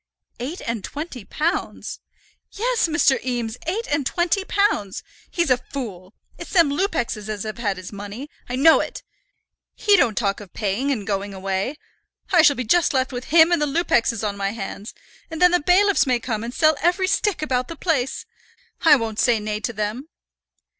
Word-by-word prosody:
"Eight 280 +9 -5
and 230 -3 -3
twenty 285 -6 -6
pounds!" 320 - -3 0.5
"Yes, 470 -1 +1
Mr. 305 -4 +2
Eames, 240 -3 -2
eight 430 +7 -2
and 290 -1 +1
twenty 345 +7 0
pounds! 390 - 0 0.3
He's 340 -6 0
a 250 - +5
fool. 225 -8 -8 0.2
It's - - -8
them 335 -6 +5
Lupexes 245 - -2
as 210 -2 -3
have 215 +1 -6
had 205 -5 -1
his 185 +2 -9
money. 205 +7 -7 0.2
I 250 - -2
know 315 +5 +6
it. - - -5 0.7
He 415 -1 +4
don't 245 - +2
talk 200 -3 0
of 200 -4 -13
paying, 215 +6 -1
and 225 -8 -1
going 200 -1 -3
away. 195 +7 -2 0.6
I 350 -3 +6
shall 290 -3 +5
be 255 - -3
just 320 +5 +2
left 260 0 +1
with 250 0 -5
him 325 +2 +5
and 345 -3 +2
the 295 - +2
Lupexes 240 - +1
on 200 - -3
my 200 0 -2
hands; 205 -1 -7 0.3
and 320 -1 -6
then 360 0 +6
the 355 - +3
bailiffs 370 +1 +3
may 250 -2 +2
come 225 -2 -3
and 235 - -4
sell 310 +3 +3
every 355 +3 +2
stick 395 -3 0
about 255 -4 -1
the 330 - -7
place. 285 -6 -1 0.6
I 315 -3 +7
won't 225 -4 -3
say 235 -2 +3
nay 210 0 -3
to 235 - -3
them." 215 +7 -4
255 Hz, 190 wpm, -22 LUFS, 215-330 Hz, 0.7 s, I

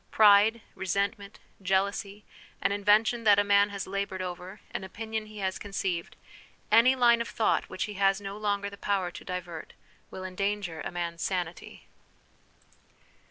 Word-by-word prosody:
Pride, 215 +2 +6
resentment, 200 +2 -2 0.2
jealousy, 195 +2 -1 0.3
an - - +1
invention 210 +3 +3
that 205 -2 +6
a 205 - +4
man 200 0 +4
has 200 -1 -5
laboured 195 -1 -3
over, 180 +2 -7
an - - -4
opinion 220 +3 -5
he 215 0 -12
has 190 -2 -2
conceived, 190 -4 -3 0.6
any 235 +4 +6
line 235 -2 +4
of 235 - -3
thought 220 - 0
which - - -3
he 210 - -5
has 195 0 +2
no 200 0 -6
longer 205 -1 -1
the 200 - -10
power 190 -3 0
to - - -10
divert, 175 -3 -6 0.4
will 185 - -8
endanger 195 -2 -3
a - - -4
man's 170 -1 -4
sanity. 180 -2 -4
200 Hz, 155 wpm, -28 LUFS, 190-210 Hz, 0.6 s, Pride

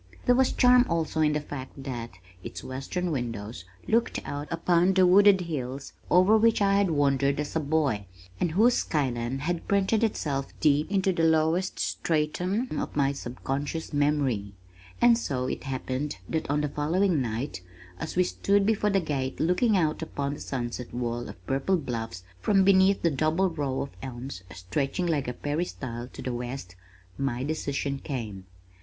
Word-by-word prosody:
There 245 - +5
was 260 +1 +3
charm 250 0 +6
also 165 -1 0
in 150 -1 +3
the 150 - +1
fact 135 -2 -8
that 120 -5 -5 0.3
its - - -7
western 135 +7 -3
windows 115 - -4 0.2
looked 230 +1 +1
out 145 +1 -4
upon 175 +2 +2
the 185 -1 +6
wooded 195 +1 +6
hills 135 -5 -5 0.2
over 185 +5 +5
which 230 +1 +4
I 200 -1 +3
had 200 -2 +3
wandered 140 -2 +2
as 150 +1 -4
a - - +3
boy, 140 -9 0 0.3
and 165 - 0
whose 230 +7 +5
sky 145 - 0
line 120 +2 -3
had 165 +4 -3
printed 200 +3 +2
itself 140 -10 -1
deep 150 0 +3
into 190 -1 +2
the 165 - -1
lowest 160 +3 +2
stratum 180 +9 -1
of - - -4
my 140 -1 +2
subconscious 140 +4 -4
memory; 140 -9 0 0.4
and 235 -1 +5
so 130 - -2
it 130 - -4
happened 135 +2 -3
that 160 -3 -2
on 145 +1 +1
the 150 - -1
following 165 +3 +1
night, 115 -3 -3 0.4
as 160 - -5
we 180 - +4
stood 200 +2 +1
before 210 -1 +2
the 195 -1 +3
gate 140 -6 -3
looking 190 +6 +3
out 155 -3 0
upon 140 -3 -3
that - - -8
sunset 120 -2 -4
wall 120 -1 -3
of 90 - -12
purple 135 +8 +1
bluffs 115 - -5 0.2
from 195 - +3
beneath 190 0 +4
the 170 - +3
double 155 +6 +1
row 140 -4 -2
of 140 - -8
elms 125 -5 -6
stretching 135 - -2
like 155 -6 0
a 125 - -2
peristyle 130 -5 -4
to - - -10
the 125 -1 -2
west, 120 -6 -6 0.4
my 130 -2 -1
decision 140 -2 -2
came. 110 -10 -5
150 Hz, 170 wpm, -27 LUFS, 130-180 Hz, 0.4 s, charm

